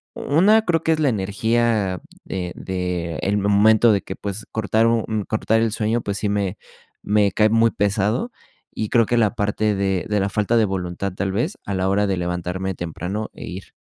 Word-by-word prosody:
1, 205 Hz, +9 st, +3 dB
creo 165 Hz, -4 st, +1 dB
que 160 Hz, -, +3 dB
es 155 Hz, -, -2 dB
la 145 Hz, -, +3 dB
energía, 105 Hz, -1 st, 0 dB, 0.3 s
eh, 90 Hz, -2 st, -3 dB
de 90 Hz, -3 st, -3 dB
el 100 Hz, +2 st, 0 dB
momento 105 Hz, +3 st, +4 dB
de 100 Hz, -, +2 dB
que, 95 Hz, -, -7 dB
pues, 100 Hz, +2 st, -6 dB
cortar 110 Hz, +1 st, +1 dB
un 115 Hz, -1 st, +2 dB
un 110 Hz, -2 st, -1 dB
cortar 110 Hz, +1 st, +1 dB
el 115 Hz, -2 st, +1 dB
sueño, 115 Hz, +1 st, 0 dB
pues 100 Hz, 0 st, -3 dB
sí 105 Hz, -, -1 dB
me 100 Hz, -2 st, -1 dB, 0.5 s
me 105 Hz, -2 st, +2 dB
cae 105 Hz, +3 st, +3 dB
muy 115 Hz, +1 st, +4 dB
pesado 105 Hz, -, 0 dB, 0.5 s
y 110 Hz, -, -2 dB
creo 115 Hz, -2 st, +4 dB
que 120 Hz, -, 0 dB
la 110 Hz, 0 st, +2 dB
parte 105 Hz, 0 st, 0 dB
de 95 Hz, -2 st, -1 dB
de 105 Hz, -1 st, +1 dB
la 100 Hz, +1 st, 0 dB
falta 105 Hz, +3 st, +1 dB
de 110 Hz, -, +4 dB
voluntad, 95 Hz, 0 st, -3 dB
tal 95 Hz, 0 st, -2 dB
vez, 120 Hz, -, -2 dB
a 100 Hz, -, -3 dB
la 95 Hz, 0 st, 0 dB
hora 100 Hz, +1 st, +2 dB
de 95 Hz, -2 st, 0 dB
levantarme 90 Hz, +2 st, -3 dB
temprano 90 Hz, +5 st, -4 dB
e -, -, -9 dB
ir. 95 Hz, +2 st, -8 dB
105 Hz, 205 wpm, -21 LUFS, 95-110 Hz, 0.5 s, momento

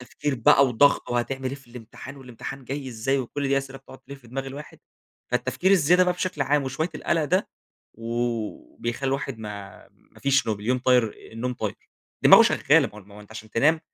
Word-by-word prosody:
تفكير 135 Hz, +3 st, -3 dB
بقى 130 Hz, +3 st, +5 dB
وضغط، 130 Hz, +3 st, +3 dB
وهتعمل 130 Hz, +2 st, -1 dB
إيه 130 Hz, -, -5 dB
في 140 Hz, -2 st, -15 dB
الامتحان؟ 125 Hz, +3 st, -10 dB
والامتحان 135 Hz, +1 st, -9 dB
جاي 135 Hz, +1 st, -5 dB
إزاي؟ 130 Hz, +3 st, -1 dB
وكل 135 Hz, +2 st, -3 dB
دي 135 Hz, 0 st, +3 dB
أسئلة 135 Hz, -1 st, -7 dB
بتقعد 135 Hz, 0 st, -14 dB
تلف 140 Hz, 0 st, -12 dB
في 120 Hz, -, -18 dB
دماغ 135 Hz, +2 st, -4 dB
الواحد. 140 Hz, +3 st, -9 dB, 0.5 s
فالتفكير 190 Hz, -, 0 dB
الزيادة 180 Hz, -1 st, +5 dB
بقى 180 Hz, -, +2 dB
بشكل 180 Hz, -4 st, -2 dB
عام 145 Hz, +1 st, +2 dB
وشوية 155 Hz, +5 st, -2 dB
القلق 160 Hz, +1 st, 0 dB
ده 185 Hz, +6 st, +1 dB, 0.5 s
و 115 Hz, -, -4 dB
بيخلي 120 Hz, +3 st, -3 dB
الواحد 135 Hz, -2 st, -3 dB
ما 105 Hz, -2 st, -9 dB
ما -, -, -23 dB
فيش 135 Hz, -1 st, +2 dB
نوم، 105 Hz, -2 st, -2 dB
اليوم 125 Hz, +4 st, 0 dB
طاير 125 Hz, -3 st, +3 dB, 0.2 s
النوم 120 Hz, +3 st, -3 dB
طاير. 110 Hz, -3 st, -4 dB, 0.5 s
دماغه -, -, +10 dB
شغالة، -, -, +3 dB
ما -, -, -13 dB
هو -, -, -10 dB
الم 100 Hz, -1 st, -15 dB
ما 100 Hz, -, -15 dB
هو 105 Hz, -, -11 dB
أنتَ 105 Hz, -, -16 dB
عشان 110 Hz, -1 st, -10 dB
تنام 155 Hz, +9 st, +3 dB
130 Hz, 200 wpm, -25 LUFS, 115-140 Hz, 0.5 s, دماغه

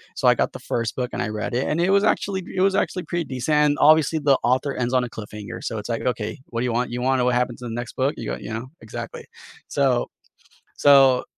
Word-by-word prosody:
So, -, -, +3 dB
I -, -, +5 dB
got -, -, 0 dB
the -, -, -7 dB
1st 115 Hz, -2 st, -2 dB
book 125 Hz, -1 st, -2 dB
and -, -, -3 dB
I 120 Hz, -, -1 dB
read 110 Hz, +3 st, -4 dB
it 125 Hz, +2 st, 0 dB
and 165 Hz, +3 st, 0 dB
it 180 Hz, -, +2 dB
was 200 Hz, +1 st, +4 dB
actually 195 Hz, -3 st, 0 dB
pr -, -, -11 dB
it 185 Hz, -, +1 dB
was 195 Hz, 0 st, +3 dB
actually 190 Hz, -2 st, -1 dB
pretty 170 Hz, +1 st, -3 dB
decent, 130 Hz, +4 st, -1 dB
and 150 Hz, 0 st, +3 dB
obviously 155 Hz, +1 st, +5 dB
the 140 Hz, -2 st, +3 dB
author 130 Hz, +3 st, +1 dB
ends 125 Hz, 0 st, -2 dB
on 125 Hz, -, +3 dB
a 120 Hz, -, -4 dB
cliffhanger, 105 Hz, -2 st, -8 dB
so 110 Hz, -2 st, -3 dB
it's 105 Hz, -, -8 dB
like, 115 Hz, -, -2 dB
"Okay, 115 Hz, -4 st, -2 dB
what 115 Hz, 0 st, -3 dB
do -, -, 0 dB
you 125 Hz, -, 0 dB
want, 120 Hz, +1 st, -1 dB
you 125 Hz, -, -3 dB
wanna 130 Hz, +1 st, +2 dB
know 125 Hz, -, +1 dB
what 125 Hz, -, +2 dB
happens 125 Hz, 0 st, -1 dB
in 125 Hz, -, -5 dB
the 115 Hz, -, -5 dB
next 120 Hz, -1 st, -6 dB
book?" 135 Hz, +3 st, +1 dB
You -, -, -7 dB
go 60 Hz, -, -3 dB
you 110 Hz, -, -7 dB
know? 115 Hz, +3 st, -5 dB
Exactly. 110 Hz, -, -8 dB, 0.4 s
So 135 Hz, -4 st, +1 dB, 0.7 s
so 135 Hz, -3 st, +6 dB
125 Hz, 275 wpm, -23 LUFS, 120-150 Hz, 0.7 s, so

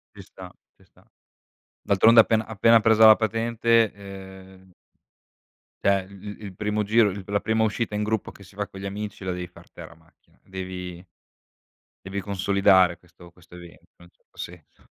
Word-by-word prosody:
Ci -, -, -11 dB
sta, -, -, -12 dB, 0.3 s
ci -, -, -25 dB
sta. -, -, -27 dB, 0.8 s
D'altronde 110 Hz, +4 st, +5 dB
appena 110 Hz, 0 st, 0 dB
appena 110 Hz, +1 st, +3 dB
presa 110 Hz, 0 st, +5 dB
la 110 Hz, -, +9 dB
patente, 115 Hz, 0 st, +1 dB
ehm 95 Hz, -1 st, -13 dB, 1.1 s
cioè 100 Hz, -1 st, +1 dB
i 100 Hz, +1 st, -11 dB
i 105 Hz, -, -11 dB
il 95 Hz, -2 st, -9 dB
primo 105 Hz, +1 st, -2 dB
giro, 110 Hz, +1 st, +3 dB
il 100 Hz, 0 st, -7 dB
la 100 Hz, 0 st, 0 dB
prima 110 Hz, +1 st, 0 dB
uscita 110 Hz, 0 st, -2 dB
in 105 Hz, -, -1 dB
gruppo 110 Hz, 0 st, -2 dB
che 100 Hz, -, -16 dB
si 95 Hz, +1 st, -18 dB
fa 105 Hz, 0 st, -4 dB
con 95 Hz, -, -12 dB
gli 100 Hz, -, -7 dB
amici 100 Hz, 0 st, -6 dB
la 95 Hz, -, -3 dB
devi 90 Hz, 0 st, -5 dB
far 90 Hz, -, -18 dB
te -, -, -11 dB
la 85 Hz, -, -15 dB
macchina, 80 Hz, +1 st, -30 dB
devi 90 Hz, -1 st, -8 dB, 1.0 s
devi 100 Hz, +1 st, -4 dB
consolidare 95 Hz, -2 st, +2 dB
questo 85 Hz, 0 st, -18 dB
questo 90 Hz, 0 st, -18 dB
evento 85 Hz, -1 st, -15 dB
in -, -, -19 dB
un -, -, -19 dB
certo -, -, -35 dB
senso. 85 Hz, -3 st, -11 dB
100 Hz, 180 wpm, -24 LUFS, 95-110 Hz, 1.1 s, la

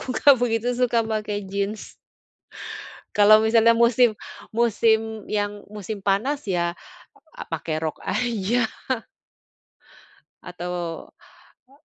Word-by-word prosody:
Aku -, -, -8 dB
gak 285 Hz, -1 st, +7 dB
begitu 240 Hz, 0 st, 0 dB
suka 245 Hz, -1 st, +1 dB
pakai 215 Hz, -2 st, -3 dB
jin. 200 Hz, +2 st, -2 dB, 1.4 s
Kalau 215 Hz, +1 st, +7 dB
misalnya 230 Hz, +1 st, +5 dB
musim 235 Hz, -1 st, +4 dB, 0.3 s
musim 220 Hz, -1 st, +1 dB
yang 205 Hz, -1 st, -2 dB
musim 210 Hz, 0 st, -6 dB
panas 220 Hz, +8 st, 0 dB
ya, 170 Hz, -2 st, 0 dB, 0.6 s
a -, -, -7 dB
pakai 165 Hz, -1 st, -3 dB
rok 160 Hz, -1 st, -3 dB
aja. 235 Hz, -1 st, 0 dB, 1.8 s
Atau 180 Hz, 0 st, -6 dB, 0.9 s
a 275 Hz, +4 st, -25 dB
220 Hz, 100 wpm, -23 LUFS, 200-235 Hz, 1.8 s, gak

